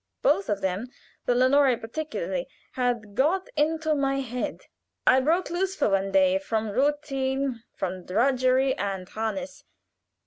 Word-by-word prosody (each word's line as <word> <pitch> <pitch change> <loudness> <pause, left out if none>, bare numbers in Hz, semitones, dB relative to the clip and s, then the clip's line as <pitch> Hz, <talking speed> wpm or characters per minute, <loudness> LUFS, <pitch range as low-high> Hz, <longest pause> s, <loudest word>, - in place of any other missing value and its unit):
Both 400 -5 +2
of 200 -1 0
them, 190 +5 -1 0.4
the 245 - +3
'Lenore' 260 0 +4
particularly, 315 - -4 0.2
had 240 -5 -1
got 325 - +1
into 315 +1 +1
my 275 -1 +1
head. 250 -1 -4 0.4
I 260 - +6
broke 330 +8 +1
lose 380 +2 -1
for 290 - +1
one 195 0 +1
day 285 +2 +4
from 220 -6 -2
routine, 270 -1 0
from 185 -1 -4
drudgery 255 +4 +2
and 195 -2 -3
harness. 245 +7 -4
265 Hz, 135 wpm, -26 LUFS, 225-290 Hz, 0.4 s, I